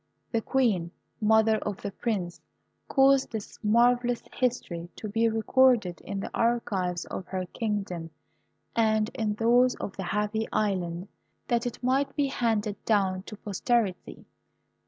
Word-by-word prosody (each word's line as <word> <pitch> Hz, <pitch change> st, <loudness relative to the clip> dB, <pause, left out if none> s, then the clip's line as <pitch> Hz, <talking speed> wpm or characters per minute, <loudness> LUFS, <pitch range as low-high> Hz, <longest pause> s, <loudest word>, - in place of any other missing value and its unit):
The 230 Hz, -, +1 dB
Queen, 220 Hz, -10 st, +1 dB, 0.3 s
mother 220 Hz, 0 st, +4 dB
of 205 Hz, -2 st, -5 dB
the 200 Hz, -, -3 dB
Prince, 190 Hz, -5 st, -3 dB, 0.5 s
caused 270 Hz, -1 st, +4 dB
this 220 Hz, -3 st, -6 dB
marvellous 240 Hz, +2 st, +3 dB
history 175 Hz, -9 st, -2 dB
to 215 Hz, -, -6 dB
be 225 Hz, +2 st, +2 dB
recorded 225 Hz, -3 st, +3 dB
in 200 Hz, -, -4 dB
the -, -, -5 dB
archives 195 Hz, -7 st, 0 dB
of 185 Hz, -, -6 dB
her 185 Hz, -1 st, -3 dB
kingdom 195 Hz, -5 st, -3 dB, 0.7 s
and 220 Hz, -1 st, +2 dB
in 215 Hz, -4 st, -1 dB
those 245 Hz, +3 st, +4 dB
of 195 Hz, -, -6 dB
the 190 Hz, -, -3 dB
Happy 210 Hz, +3 st, -1 dB
Island, 185 Hz, -4 st, -1 dB, 0.4 s
that 240 Hz, 0 st, +1 dB
it 245 Hz, -, -7 dB
might 265 Hz, +3 st, +1 dB
be 290 Hz, -, +2 dB
handed 225 Hz, -6 st, -1 dB
down 195 Hz, -4 st, +1 dB
to 215 Hz, -, -7 dB
posterity. 205 Hz, -1 st, -1 dB
220 Hz, 135 wpm, -28 LUFS, 195-240 Hz, 0.7 s, mother